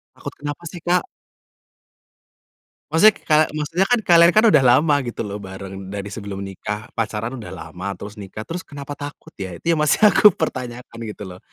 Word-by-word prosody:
Takut -, -, -8 dB
kenapa 145 Hz, +3 st, -6 dB
sih, 175 Hz, 0 st, -9 dB
Kak? 175 Hz, +1 st, +2 dB, 1.9 s
Maksudnya 205 Hz, +7 st, +6 dB
ka 155 Hz, -, +6 dB, 0.2 s
maksudnya 160 Hz, +5 st, 0 dB
kan 245 Hz, +2 st, +2 dB
kalian 170 Hz, -3 st, +6 dB
kan 215 Hz, -, +5 dB
udah 140 Hz, -, +5 dB
lama 145 Hz, +5 st, +5 dB
gitu 120 Hz, -, -4 dB
loh 105 Hz, -1 st, -4 dB
bareng, 95 Hz, 0 st, -8 dB
dari 100 Hz, 0 st, -5 dB
sebelum 100 Hz, -2 st, -6 dB
nikah 105 Hz, +3 st, -6 dB
pacaran 115 Hz, +3 st, -2 dB
udah 100 Hz, -6 st, -8 dB
lama, 90 Hz, +1 st, -8 dB
terus 100 Hz, +3 st, -10 dB
nikah, 100 Hz, +1 st, -8 dB
terus 170 Hz, +10 st, -6 dB
kenapa 145 Hz, 0 st, -8 dB
takut 145 Hz, 0 st, -8 dB
ya? 95 Hz, -3 st, -7 dB
Itu -, -, -45 dB
yang -, -, -2 dB
masih -, -, +2 dB
aku 210 Hz, -1 st, +6 dB
pertanyakan 125 Hz, -6 st, -5 dB
gitu 105 Hz, -1 st, -8 dB
loh. 90 Hz, 0 st, -11 dB
120 Hz, 175 wpm, -21 LUFS, 100-155 Hz, 1.9 s, Maksudnya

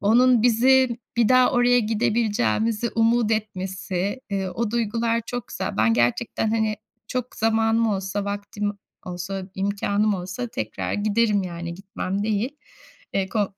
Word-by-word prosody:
onun 240 Hz, +3 st, +4 dB
bizi 245 Hz, +1 st, +4 dB, 0.2 s
bir 235 Hz, -2 st, +4 dB
daha 255 Hz, 0 st, +5 dB
oraya 245 Hz, 0 st, +4 dB
gidebileceğimizi 225 Hz, 0 st, +1 dB
umut 230 Hz, 0 st, +3 dB
etmesi, 190 Hz, 0 st, -3 dB
eee, 195 Hz, -1 st, -1 dB
o 215 Hz, +4 st, -2 dB
duygular 230 Hz, 0 st, 0 dB
çok 245 Hz, -2 st, -5 dB
güzel. -, -, -4 dB
Ben 110 Hz, +1 st, +3 dB
gerçekten, 120 Hz, -, +1 dB
hani, 220 Hz, -1 st, +1 dB, 0.3 s
çok 250 Hz, -1 st, -4 dB
zamanım 225 Hz, +1 st, +2 dB
olsa, 200 Hz, 0 st, -2 dB
vaktim 205 Hz, 0 st, -3 dB, 0.3 s
olsa, 185 Hz, +1 st, -5 dB
imkânım 200 Hz, +1 st, 0 dB
olsa 185 Hz, +7 st, -4 dB
tekrar 110 Hz, -, -4 dB
giderim, 210 Hz, 0 st, +2 dB
yani 170 Hz, -1 st, -5 dB
gitmem 195 Hz, +1 st, -4 dB
değil. 220 Hz, +6 st, -1 dB, 0.6 s
Eee, 190 Hz, -1 st, 0 dB
ko 205 Hz, -2 st, -1 dB
215 Hz, 135 wpm, -24 LUFS, 195-230 Hz, 0.6 s, daha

